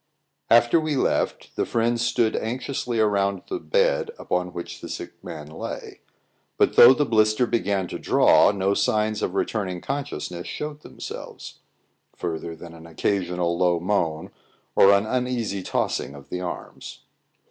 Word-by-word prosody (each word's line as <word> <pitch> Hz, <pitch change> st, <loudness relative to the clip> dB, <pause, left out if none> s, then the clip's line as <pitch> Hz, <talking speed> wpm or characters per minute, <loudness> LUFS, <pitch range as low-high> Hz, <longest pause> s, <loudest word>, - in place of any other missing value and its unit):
After 120 Hz, +6 st, +5 dB
we 155 Hz, -2 st, -1 dB
left, 130 Hz, -, -1 dB
the -, -, 0 dB
friends 115 Hz, 0 st, 0 dB
stood 115 Hz, -2 st, +1 dB
anxiously 125 Hz, +1 st, -3 dB
around 100 Hz, -2 st, +1 dB
the 370 Hz, -, -1 dB
bed -, -, +1 dB
upon 90 Hz, 0 st, -2 dB
which 85 Hz, -1 st, -7 dB
the -, -, -8 dB
sick -, -, -8 dB
man 75 Hz, -, -7 dB
lay; 75 Hz, +1 st, -7 dB, 0.6 s
but -, -, +3 dB
though 125 Hz, +2 st, +9 dB
the 145 Hz, -, +1 dB
blister 110 Hz, 0 st, +3 dB
began 100 Hz, -5 st, 0 dB
to -, -, -5 dB
draw, -, -, +5 dB
no 100 Hz, -1 st, 0 dB
signs 105 Hz, +1 st, +1 dB
of 95 Hz, -, -2 dB
returning 95 Hz, -5 st, -1 dB
consciousness 135 Hz, -10 st, -5 dB
showed 150 Hz, 0 st, -5 dB
themselves, -, -, -9 dB, 0.6 s
further 85 Hz, 0 st, -4 dB
than 85 Hz, +1 st, -11 dB
an 80 Hz, 0 st, -12 dB
occasional 90 Hz, 0 st, -1 dB
low 90 Hz, -1 st, +2 dB
moan, 85 Hz, -4 st, -1 dB, 0.4 s
or 100 Hz, -, +7 dB
an 100 Hz, +1 st, +3 dB
uneasy 125 Hz, -4 st, -1 dB
tossing 70 Hz, -, -2 dB
of 70 Hz, -1 st, -13 dB
the 90 Hz, -, -4 dB
arms. 90 Hz, -, -7 dB
100 Hz, 145 wpm, -24 LUFS, 90-120 Hz, 0.6 s, though